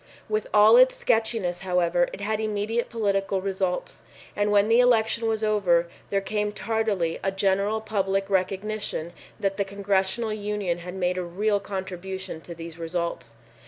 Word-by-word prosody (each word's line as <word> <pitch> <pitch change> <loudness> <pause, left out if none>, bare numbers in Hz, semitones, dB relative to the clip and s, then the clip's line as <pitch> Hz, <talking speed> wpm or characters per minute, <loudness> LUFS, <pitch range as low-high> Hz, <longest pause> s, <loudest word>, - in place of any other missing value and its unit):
With 215 0 -1
all 215 +3 +7
its 255 +1 +6
sketchiness, 220 -6 0
however, 175 -2 +1
it - - -8
had 215 +1 -1
immediate 215 +2 -1
political 200 -3 0
results, 190 -1 -2 0.3
and 205 0 +1
when 205 0 +4
the 230 +2 +5
election 230 -2 +3
was 220 -1 0
over, 180 -6 +2 0.2
there 200 -1 +1
came 210 +1 -1
tardily 210 -7 -1
a 195 - 0
general 195 +2 +1
public 195 -2 -1
recognition 195 -2 -2 0.3
that 195 -1 -1
the 200 - +2
Congressional 200 +3 -1
Union 205 -4 -2
had 180 +2 -7
made 180 -1 0
a - - -2
real 205 +4 0
contribution 190 -3 -6
to 170 - -9
these 165 0 -9
results. 165 -8 -4
195 Hz, 155 wpm, -25 LUFS, 180-215 Hz, 0.3 s, all